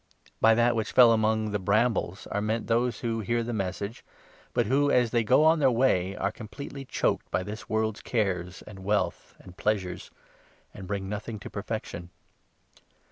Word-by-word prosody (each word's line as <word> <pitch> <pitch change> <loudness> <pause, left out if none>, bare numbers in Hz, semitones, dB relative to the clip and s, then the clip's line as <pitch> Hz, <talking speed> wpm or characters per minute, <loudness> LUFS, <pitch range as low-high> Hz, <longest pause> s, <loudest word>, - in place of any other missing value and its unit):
By 115 0 +6
that 120 +1 +3
which 110 -2 -2
fell 120 -2 +8
among 110 -1 +1
the 105 - -1
brambles 100 -1 +1
are 105 - 0
meant 110 +2 -1
those 120 +1 0
who 115 -2 -1
14 110 - -4
hear 120 0 +1
the 120 +1 -4
Message, 100 +2 -4 0.5
but 120 -2 +1
who, 140 +6 +2
as 125 -4 +3
they 120 -2 +2
go 130 +7 +4
on 160 +1 +5
their 135 -3 +5
way, 100 -7 +2
are 100 - -1
com 110 0 -10
pletely 135 +5 -8
choked - - -1
by - - -1
this 105 +3 -8
world's 110 -1 -1
cares 90 -6 -2
and 100 -2 -11
wealth 105 +2 -1
and 90 -1 -15
pleasures, 95 -4 -2 0.6
and 95 - -9
bring 100 -1 -3
nothing 105 +2 -5
to - - -8
perfection. 100 -4 -5
110 Hz, 185 wpm, -27 LUFS, 100-120 Hz, 0.6 s, fell